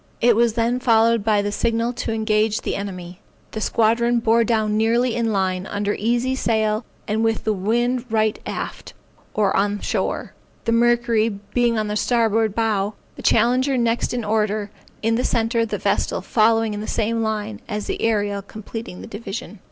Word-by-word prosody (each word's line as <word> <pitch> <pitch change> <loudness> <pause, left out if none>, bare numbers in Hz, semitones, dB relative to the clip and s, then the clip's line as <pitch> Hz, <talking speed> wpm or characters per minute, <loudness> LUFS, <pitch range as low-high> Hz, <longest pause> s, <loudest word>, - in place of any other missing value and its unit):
It 235 -1 +4
was 235 0 +3
then 235 +2 +1
followed 230 -2 +3
by 210 -1 +2
the 205 - -2
signal 230 +2 0
to 235 - -3
engage 215 -1 +1
the - - -2
enemy. 185 -2 -6 0.3
The 220 - -5
squadron 235 +2 +2
bore 230 0 +3
down 220 -2 +1
nearly 230 +2 +2
in 230 -1 0
line, 190 -1 -1
under 205 0 -1
easy 240 +4 0
sail, 220 -3 0 0.2
and 220 +1 0
with 225 -1 0
the 215 - +1
wind 240 +5 0
right 220 -1 +1
aft, - - -6 0.4
or 205 -2 +2
on 205 +1 +1
shore; - - -2 0.3
the 230 - +1
Mercury 235 -1 +3
being 230 +3 -1
on 215 - 0
the 210 - -2
starboard 225 -2 +1
bow, 215 -2 0 0.2
the - - -9
Challenger 255 +4 +3
next 235 -1 +1
in 240 -3 -2
order, 210 -1 0 0.3
in 225 +1 +2
the 250 - 0
centre, 230 -1 +1
the - - -3
Vestal - - 0
following 225 -1 +2
in 205 - -4
the 215 - -6
same 230 +1 0
line, 220 0 -3
and 210 -2 -3
the - - -4
Ariel 205 -3 0
completing 215 -1 -8
the - - -9
division. 210 0 -7
220 Hz, 175 wpm, -22 LUFS, 210-235 Hz, 0.4 s, It